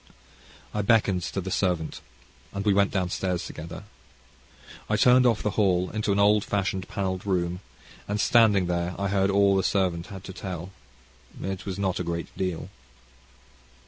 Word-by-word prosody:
I 105 - 0
beckoned 100 -3 +3
to 95 - -2
the 95 +1 -5
servant, 90 -4 -1 0.5
and 100 +1 -4
we 105 - +4
went 100 0 +3
downstairs 90 -1 -1
together. 85 +5 -8 1.1
I 105 - +2
turned 125 +3 +6
off 115 -3 +1
the 105 - 0
hall 90 -2 +2
into 105 -1 -1
an 100 - +1
old 105 +1 +4
fashioned 95 -2 -2
panelled 95 -2 -3
room, 90 -2 -1 0.5
and 105 - -1
there 105 - +1
standing, 105 -6 +4
I 90 +3 -2
heard 95 0 +2
all 100 0 +4
the 95 - +3
servant 90 -3 0
had 95 -2 -9
to 95 - -8
tell. 90 -2 -6 0.7
It 95 0 -4
was 95 - -3
not 95 -2 -1
a - - -1
great 85 -1 -4
deal. 90 -2 -3
95 Hz, 165 wpm, -26 LUFS, 90-100 Hz, 1.1 s, turned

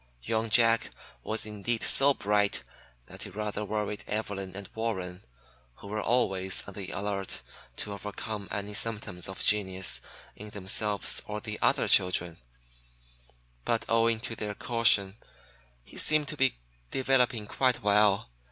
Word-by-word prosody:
Young 110 - -1
Jack 115 0 +4 0.3
was 110 - +1
indeed 110 +2 -2
so 140 0 +5
bright 105 -1 +1 0.4
that - - -9
it - - -13
rather 105 0 -3
worried 105 0 -3
Evelyn 100 -3 -3
and 100 -1 -7
Warren, 95 -5 -3 0.5
who 100 - -11
were 105 +1 -2
always 95 -6 +2
on 100 - -7
the 95 -1 -5
alert 100 -1 -3 0.3
to 105 - -3
overcome 105 +1 -6
any 100 0 -4
symptoms 105 -5 -2
of 95 - -5
genius 95 -3 +1 0.3
in 105 +1 -9
themselves 100 +1 0
or 105 0 -3
the 105 0 -6
other - - +3
children; 90 -2 +3 1.3
but 115 - 0
owing 115 0 +3
to 115 - -2
their 105 -1 -4
caution, 105 -4 +3 0.7
he - - -7
seemed 155 -1 +4
to - - -4
be 135 -2 +2 0.3
developing 125 -5 +1 0.4
well. 100 - +3
105 Hz, 135 wpm, -29 LUFS, 100-115 Hz, 1.3 s, so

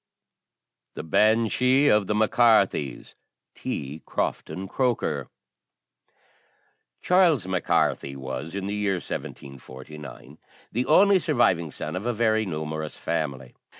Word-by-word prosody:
THE - - -6
BANSHEE 115 - +3
OF 105 -2 +3
THE 105 - 0
MAC 110 0 +2
CARTHYS. 100 - +2 0.4
T. 70 +3 -5
CROFTON 95 +1 -3
CROKER. 100 - -1 1.8
Charles 170 - +3
Mac 95 -1 -2
Carthy 70 0 0
was, 65 +5 -6
in 100 -1 -3
the 100 - -3
year 105 -1 0
1749, 70 -2 -9 0.3
the 125 +3 -2
only 195 +4 +5
surviving 105 - +1
son 75 - -6
of 100 +6 -4
a 120 - 0
very 110 -1 +1
numerous 80 -2 -4
family. 70 -6 -3
95 Hz, 115 wpm, -25 LUFS, 75-115 Hz, 1.8 s, only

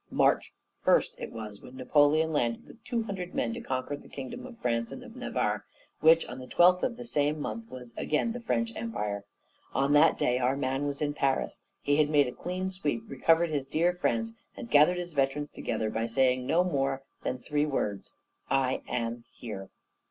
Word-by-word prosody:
March - - +2 0.3
first - - +3
it - - -5
was, 105 -3 -7
when 125 - -12
Napoleon 150 +4 +3
landed 120 -5 0
with 230 - -16
two 235 -2 -1
hundred 190 -4 -5
men - - 0
to 235 - -5
conquer 130 - -2
that - - -14
kingdom 140 - -6
of 245 -2 -12
France 115 - -1
and - - -7
of - - -12
Navarre, - - -1 0.4
which, 165 +1 +6
on 125 - -7
the 130 - -9
twentieth 180 +4 +5
of 235 - -1
the 245 - -7
same 150 -6 +1
month 230 +9 -5
was 125 -2 -9
again 155 +9 0
the 245 - -4
French 230 0 -1
Empire. 105 - -3 0.5
On 140 +2 +3
that 145 - +6
day 125 +1 +2
our 130 +2 +1
MAN 135 +1 -1
was 140 +1 -2
in 145 0 0
Paris; 135 -2 0 0.2
he 145 0 +3
had 150 -1 +4
made 145 -2 +5
a - - -3
clean 185 +6 -3
sweep, 145 -11 -2
recovered 165 +5 +3
his 140 -3 -1
dear 170 +5 +2
France, 115 -10 0 0.2
and 115 - -8
gathered 150 +5 +6
his 175 -1 -4
veterans 140 +1 0
together 110 -1 -2
by 115 +1 -1
saying 125 +1 +2
no 170 +3 +4
more 135 -5 0 0.2
than 130 - -2
three 150 +3 0
words, 105 -8 -2 0.3
'I 135 -1 +1
am 120 -1 -2
here.' 100 -5 -7
145 Hz, 195 wpm, -29 LUFS, 125-170 Hz, 0.5 s, which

